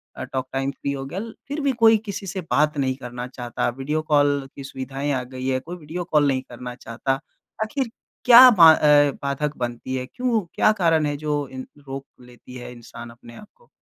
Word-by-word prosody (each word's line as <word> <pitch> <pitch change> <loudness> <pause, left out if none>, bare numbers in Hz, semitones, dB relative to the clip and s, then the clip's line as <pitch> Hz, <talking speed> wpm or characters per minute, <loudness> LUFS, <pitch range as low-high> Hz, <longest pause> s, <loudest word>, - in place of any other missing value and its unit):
अ, - - -6
talk 130 -1 -4
time 135 +1 -1
free 140 +1 -4
हो 135 -1 -5
गया। 175 +8 -5 0.3
फ़िर 290 +2 -4
भी 280 -1 +2
कोई 225 0 +7
किसी 200 -1 -6
से 190 +1 -4
बात 150 0 +2
नहीं 130 -2 0
करना 125 -1 -7
चाहता, 120 -2 -4
वीडियो 150 +4 -2
कॉल 145 -2 +2
की 140 - -8
सुविधाएँ 135 +2 -4
आ 125 -1 -1
गई 130 +1 -7
हैं, 130 -1 0
कोई 175 +4 -8
वीडियो 165 +3 -6
कॉल 150 -2 +4
नहीं 130 -1 +1
करना 125 0 -8
चाहता। 135 +4 -3 0.4
आखिर 255 +3 -3 0.4
क्या 250 +1 +10
बा 165 -6 +8
अ, 145 -2 +5
बाधक 145 +2 -2
बनती 120 +1 -4
है? 130 0 -3
क्यों 240 - -1
क्या 215 - +4
कारण 160 -2 +3
है 145 0 -1
जो 145 -2 -2
इन 130 0 -8 0.2
रोक 135 +1 -6 0.2
लेती 125 +1 -15
है 125 0 -8
इंसान 120 0 -11
अपने 120 0 -14
आप 210 - -13
को? 485 -1 -27
140 Hz, 210 wpm, -23 LUFS, 130-160 Hz, 0.4 s, क्या